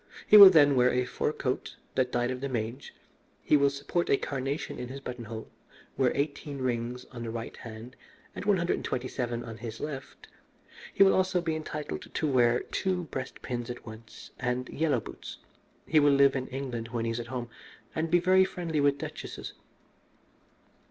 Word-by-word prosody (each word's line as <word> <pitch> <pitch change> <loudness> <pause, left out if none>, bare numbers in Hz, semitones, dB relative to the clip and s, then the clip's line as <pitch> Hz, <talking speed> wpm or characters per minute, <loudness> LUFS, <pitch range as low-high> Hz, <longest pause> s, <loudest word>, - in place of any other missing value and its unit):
He - - +6
will 200 -2 +13
then 145 -5 +6
wear 125 0 +5
a 125 0 +1
fur 125 - -1
coat 130 -4 -3 0.2
that 130 -1 +1
died 120 +1 0
of 130 0 -5
the 140 - -2
mange, 120 +2 -4 0.5
he - - +4
will 140 -1 +5
support 140 +5 -2
a 140 - +5
carnation 140 +2 -3
in 125 - -4
his 135 +2 -7
buttonhole, 115 -4 -7 0.4
wear 130 -2 +2
eighteen 140 0 -3
rings 125 -1 -2
on 120 -2 -7
his 115 - -4
right 115 0 -6
hand 115 +2 -10 0.4
and - - -5
one 205 -2 +4
hundred 170 0 0
and - - -7
twenty 130 +1 -2
seven 120 -2 -3
on 115 -1 -8
his 115 -1 -7
left. 140 -3 -7 0.6
He - - +5
will 195 - +5
also 185 -1 +2
be 165 -2 -1
entitled 150 -1 -5
to 155 - 0
wear 120 -3 +3
two 185 -2 -2
breast 130 -1 -6
pins 120 -1 -4
at 120 - -7
once 110 0 -11
and 125 0 -1
yellow 145 -6 0
boots. - - -9 0.5
He 155 - +4
will 145 -1 +5
live 140 0 +5
in 130 -1 -2
England 125 -4 -4
when 115 -1 -3
he 115 - 0
is 115 - -3
at 120 - -6
home, 120 -1 -5 0.4
and 160 +1 -1
be 175 - +5
very 185 +2 +5
friendly 170 -4 -2
with 140 0 +3
duchesses. - - -7
130 Hz, 190 wpm, -29 LUFS, 120-150 Hz, 0.6 s, will